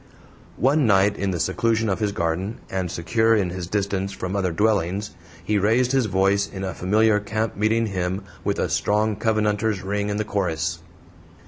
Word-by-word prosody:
One 140 +1 +3
night, 100 0 +4
in 100 - -2
the 90 -3 -2
seclusion 115 +5 +1
of 95 - 0
his 105 -2 0
garden, 90 +4 -2
and 95 -2 -2
secure 110 +7 +2
in 95 -5 0
his 90 -1 -5
distance 100 0 -1
from 90 0 -4
other 95 -3 0
dwellings, 100 +1 0 0.3
he 105 +3 +1
raised 115 +5 +2
his 135 -4 +2
voice 100 +1 +2
in 95 -1 -6
a 95 -2 -3
familiar 105 +3 +2
camp 110 +1 -2
meeting 110 +3 +1
hymn 95 -1 -2 0.2
with - - -1
a - - 0
strong 105 +1 +1
Covenanter's 105 -1 0
ring 100 +1 -2
in 105 - -1
the 110 - -1
chorus. 95 -7 -1
100 Hz, 180 wpm, -23 LUFS, 95-110 Hz, 0.3 s, night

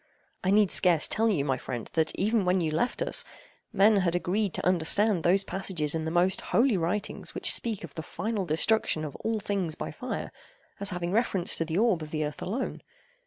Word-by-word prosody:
I 185 - 0
need 205 -1 +4
scarce 175 -4 +4
tell 225 +1 +1
you, 155 -10 0
my 135 -3 -1
friend, 120 -3 -6
that, 160 -1 +1
even 215 +2 +1
when 180 +1 +2
you 160 -3 -1
left 165 +11 -1
us, - - +4 0.5
men 210 +2 +4
had 180 -3 +1
agreed 195 +3 0
to - - -4
understand 185 +2 +2
those 185 +4 +3
passages 180 -7 -2
in 160 -1 -2
the - - -1
most 175 +3 +1
holy 240 -1 +2
writings 185 +4 -3
which - - +3
speak 220 -5 -3
of 160 -4 -9
the 160 - -5
final 215 +5 -3
destruction 160 0 +2
of 145 - -7
all 225 -1 -2
things 195 -6 -2
by - - -5
fire, - - -5 0.5
as 200 0 +2
having 175 -2 -3
reference 195 -4 +1
to 165 - 0
the 160 +1 -3
orb 215 -6 +2
of 155 - -7
the 155 0 -2
earth 150 - -7
alone. 225 +8 -4
185 Hz, 210 wpm, -27 LUFS, 160-210 Hz, 0.5 s, need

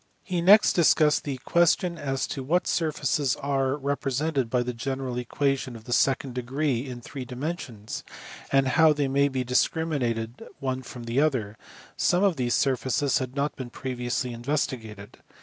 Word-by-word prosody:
He 180 -3 -2
next 205 +5 +7
dis 170 -3 +5
cussed 150 -1 +2
the 140 -3 -3
question 170 +1 +3
as 135 -2 -1
to 135 - -4
what 165 +7 +1
surfaces 150 -4 0
are 135 -1 0
represented 140 -1 -1
by 125 0 +1
the 125 0 -3
general 130 +1 -3
equation 135 +1 -1
of 110 - -11
the 120 +1 -4
second 135 0 +2
degree 130 +1 -1
in 125 -2 -7
three 135 +2 -7
dimensions, 125 - -5 0.5
and 135 -1 +3
how 160 +2 +5
they 145 -1 0
may 140 +1 +3
be 130 -2 -2
discriminated 125 -3 0 0.2
one 130 -1 -2
from 120 -1 -9
the 115 +4 +1
other: 125 -9 0 0.4
some 180 +2 +2
of 195 -4 +3
these 125 -3 0
surfaces 135 +1 +1
had 130 0 -5
not 140 +1 -1
been 130 -2 -6
previously 125 0 -3
investigated. 115 -5 -4
135 Hz, 165 wpm, -26 LUFS, 125-145 Hz, 0.5 s, next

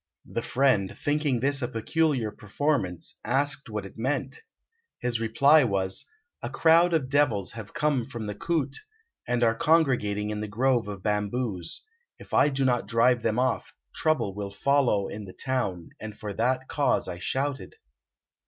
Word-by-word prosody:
The - - -3
friend, 125 -8 +1
thinking 145 -4 0
this 140 +1 +2
a 120 - 0
peculiar 130 0 0
performance, 105 - -2
asked 140 -1 0
what 105 -2 -4
it 95 - -12
meant. 135 - -2 0.6
His 120 -2 -1
reply 140 +7 +5
was, 95 -4 -1 0.3
"A 120 - -4
crowd 165 +4 +4
of 145 -5 0
devils 130 -9 +1
have 110 -3 -9
come 145 -6 +1
from 120 -5 -6
the 105 - -3
koot, 145 +3 -1 0.5
and 120 0 +1
are 115 -1 +4
congregating 125 -9 +2
in 105 0 -3
the 105 - -3
grove 120 +2 +1
of 100 -2 -7
bamboos; 105 -3 -2 0.3
if - - -14
I - - +5
do 135 -1 0
not 125 -2 +1
drive 120 +1 +3
them 110 0 0
off 130 0 0 0.2
trouble 155 -11 +1
will 100 0 -5
follow 120 -1 +2
in 105 0 -7
the 95 - -10
town, 110 -10 -2
and 110 -1 -8
for 105 -1 -5
that 130 +4 0
cause 145 -3 +1
I 90 -1 -5
shouted." 135 +6 -2
125 Hz, 160 wpm, -27 LUFS, 105-140 Hz, 0.6 s, reply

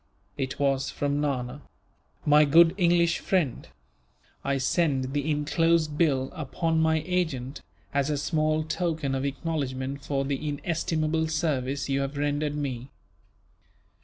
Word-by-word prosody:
It 130 -2 -3
was 135 -1 +1
from 145 0 -1
Nana. 135 -1 -2 0.6
"My 150 0 +6
good 165 +3 +6
English 170 -2 +3
friend, 170 -10 0 0.8
"I 140 0 0
send 135 -1 +1
the 145 +1 -1
enclosed 155 +1 +2
bill, 135 -5 +1
upon 160 +2 -1
my 160 -1 +2
agent, 160 -8 -2 0.3
as 140 0 +1
a 150 - 0
small 155 +1 +1
token 155 -3 -2
of 135 +1 -1
acknowledgment 140 -2 -3
for 135 -1 -1
the 145 +2 -2
inestimable 160 +1 -1
service 140 -4 -1
you 135 0 0
have 135 +1 -3
rendered 145 +1 0
me. 135 -3 -4
145 Hz, 130 wpm, -27 LUFS, 135-160 Hz, 0.8 s, My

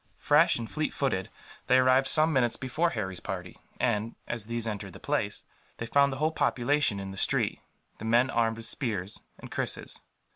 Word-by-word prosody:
Fresh - - +4
and 115 -1 -5
fleet 155 +4 -3
footed, 110 -10 -1 0.4
they 130 0 +5
arrived 130 +1 +4
some 155 +1 +4
minutes 120 -4 +2
before 155 +6 0
Harry's 95 - -4
party 90 -3 -6 0.2
and, 105 +2 0
as 115 -3 -2
these 115 -1 0
entered 105 -3 -4
the - - -11
place, - - -2 0.3
they 115 - -4
found 140 +4 +3
the 135 - -4
whole 155 +3 +1
population 135 -6 +1
in 95 0 -6
the 95 - -9
street, - - +2 0.4
the 110 - -6
men 120 +3 +3
armed 115 -1 +1
with 115 - -7
spears 105 -6 -2 0.2
and - - -11
krises. - - -3
120 Hz, 185 wpm, -28 LUFS, 105-135 Hz, 0.4 s, they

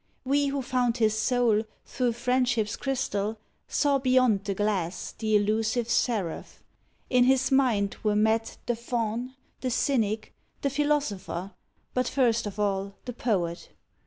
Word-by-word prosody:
We, 285 +2 +2
who 275 -1 -2
found 250 -1 0
his 220 -2 +2
soul 225 -1 +2 0.2
Thro 250 -2 0
friendship's 240 -2 0
crystal, 225 -6 -2 0.3
saw 285 -2 +2
beyond 255 -6 +3
the 200 - -2
glass 190 -4 -1
The 215 -1 0
elusive 220 +3 +1
seraph. 210 -11 -1 0.5
In 250 -1 +5
his 265 +1 +3
mind 235 -7 +2
were 210 -1 +1
met 220 +1 +1
The 240 - 0
faun, 235 +1 -3 0.2
the 255 - -2
cynic, 225 -4 0 0.3
the 280 - +1
philosopher, 235 - -1 0.4
But 250 -1 +1
first 235 -5 +2
of 205 - -7
all, 200 -1 -1
the 245 - -5
poet. 180 -8 -1
230 Hz, 135 wpm, -27 LUFS, 210-255 Hz, 0.5 s, In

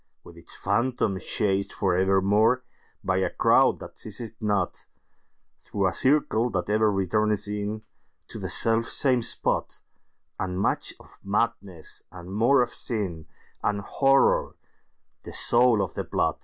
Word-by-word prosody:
With 85 - -14
its 85 - -11
Phantom 105 -1 0
chased 100 -1 -1
for 95 -3 0
evermore, 100 +6 +2 0.4
By 95 -1 0
a 95 - +1
crowd - - +3
that - - -10
seize 105 +1 -7
it 115 -3 -7
not, 100 -4 -1 0.7
Through 100 -1 -3
a 95 - +1
circle 130 - +2
that 95 -1 -2
ever 110 0 +3
returneth 105 +2 0
inTo 105 +1 -4 0.5
the - - -5
self 115 0 +1
same 130 -3 +2
spot, - - -1 0.6
And 90 -1 -3
much - - -1
of - - -18
Madness, 100 -4 -3
and 90 +1 -10
more 120 +5 +4
of 120 - -7
Sin, 95 - -4 0.3
And 100 -1 -1
Horror 135 +6 +2 0.7
the - - -10
soul 120 -3 +4
of 95 - -5
the - - -3
plot. - - -1
105 Hz, 140 wpm, -25 LUFS, 95-115 Hz, 0.7 s, more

